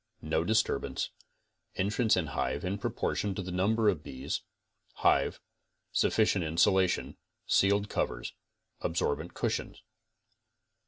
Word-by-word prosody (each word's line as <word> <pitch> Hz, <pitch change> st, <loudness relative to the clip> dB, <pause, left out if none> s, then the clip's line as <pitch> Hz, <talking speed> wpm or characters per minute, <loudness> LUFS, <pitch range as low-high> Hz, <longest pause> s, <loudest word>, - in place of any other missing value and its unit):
No 80 Hz, +1 st, +1 dB
disturbance. 110 Hz, +4 st, 0 dB, 0.6 s
Entrance 105 Hz, +4 st, +2 dB
and 85 Hz, -5 st, -1 dB
hive -, -, -2 dB
in 95 Hz, +2 st, -2 dB
proportion 100 Hz, 0 st, -1 dB
to 95 Hz, -, -3 dB
the 90 Hz, -, -5 dB
number 105 Hz, +5 st, +2 dB
of 95 Hz, -7 st, +2 dB
bees. 65 Hz, -2 st, -4 dB, 0.5 s
Hive. -, -, +2 dB, 0.5 s
Sufficient 105 Hz, -4 st, +2 dB
insulation. 90 Hz, +3 st, +2 dB, 0.3 s
Sealed 100 Hz, +1 st, +3 dB
covers. -, -, -2 dB, 0.5 s
Absorbent 80 Hz, -3 st, -1 dB
cushions? -, -, -2 dB
95 Hz, 105 wpm, -30 LUFS, 85-105 Hz, 0.6 s, Sealed